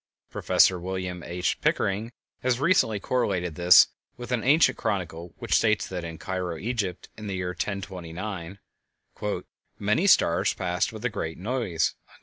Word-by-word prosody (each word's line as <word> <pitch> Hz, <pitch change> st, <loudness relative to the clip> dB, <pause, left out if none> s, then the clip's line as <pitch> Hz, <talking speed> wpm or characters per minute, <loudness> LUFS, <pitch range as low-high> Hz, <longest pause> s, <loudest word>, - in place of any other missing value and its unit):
Prof. -, -, +4 dB
William 90 Hz, 0 st, -4 dB
H. 90 Hz, +1 st, -2 dB
Pickering 105 Hz, +4 st, 0 dB, 0.3 s
has 125 Hz, -1 st, +1 dB
recently 140 Hz, -, +3 dB
correlated 95 Hz, -8 st, -1 dB
this 90 Hz, +1 st, +7 dB, 0.3 s
with 120 Hz, 0 st, -8 dB
an 125 Hz, -2 st, 0 dB
ancient 150 Hz, +6 st, +5 dB
chronicle 90 Hz, -6 st, -3 dB
which -, -, -3 dB
states 110 Hz, -2 st, +3 dB
that 90 Hz, -2 st, -5 dB
at 80 Hz, -1 st, -7 dB
Cairo, 90 Hz, -3 st, -3 dB
Egypt, 100 Hz, -3 st, -3 dB
in 110 Hz, -1 st, -7 dB
the 100 Hz, -, -3 dB
year 90 Hz, -1 st, -2 dB
1029, 95 Hz, -1 st, -5 dB, 1.2 s
"many -, -, +1 dB
stars -, -, +4 dB
passed 90 Hz, -1 st, -1 dB
with 110 Hz, +1 st, -8 dB
a -, -, +2 dB
great 80 Hz, -7 st, -4 dB
noise." 100 Hz, -6 st, -1 dB
95 Hz, 140 wpm, -26 LUFS, 90-110 Hz, 1.2 s, this